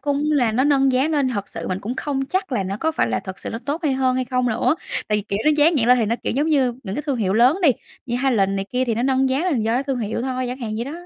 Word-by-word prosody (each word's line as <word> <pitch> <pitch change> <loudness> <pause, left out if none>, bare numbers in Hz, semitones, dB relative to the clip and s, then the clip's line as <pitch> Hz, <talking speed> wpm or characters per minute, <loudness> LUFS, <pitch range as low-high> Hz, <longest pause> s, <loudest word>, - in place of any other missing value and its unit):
cũng 285 -1 -1
là 245 -6 +2
nó 260 +4 +2
nâng 275 -2 +3
giá 260 +4 +2
nên 290 -4 +1
thật 205 -5 -3
sự - - -6
mình 185 0 -2
cũng 225 +5 -4
không 270 -2 -2
chắc 370 -1 -2
là 200 - +1
nó 195 +2 -3
có 320 +7 -1
phải - - +1
là - - -1
thật 190 -1 -8
sự - - -6
nó 225 - -4
tốt 285 +6 -4
hay 290 -4 +1
hơn, 260 -1 +1
hay 255 - 0
không 250 0 0
nữa. 230 +7 +1 0.3
Tại 210 0 +2
vì, - - -4
kiểu, 200 0 -3
nó 305 - +5
dán 310 +3 +4
nhãn 240 -4 +1
lên 250 0 +6
thì 225 - +2
nó, 230 - 0
kiểu, - - -1
giống 290 +5 0
như 265 -6 +2
những 195 -3 -5
cái 295 - -3
thương 280 -4 -1
hiệu 195 -5 0
lớn 250 - +4
đi, 300 - +6 0.4
như 240 - -1
Highlands 200 -7 +2
này 195 - -2
kia 255 +1 0
thì 235 - -1
nó 235 - -1
nâng 265 0 +2
giá 270 +6 0
lên 365 - +1
là 260 - +1
do 225 +1 0
cái 260 - +1
thương 270 -3 -2
hiệu 225 +1 -3
thôi, 255 0 -2
chẳng 250 - -5
hạn 230 -4 -4
vậy 235 - -2
đó. 280 - -6
255 Hz, 340 wpm, -21 LUFS, 225-280 Hz, 0.4 s, lên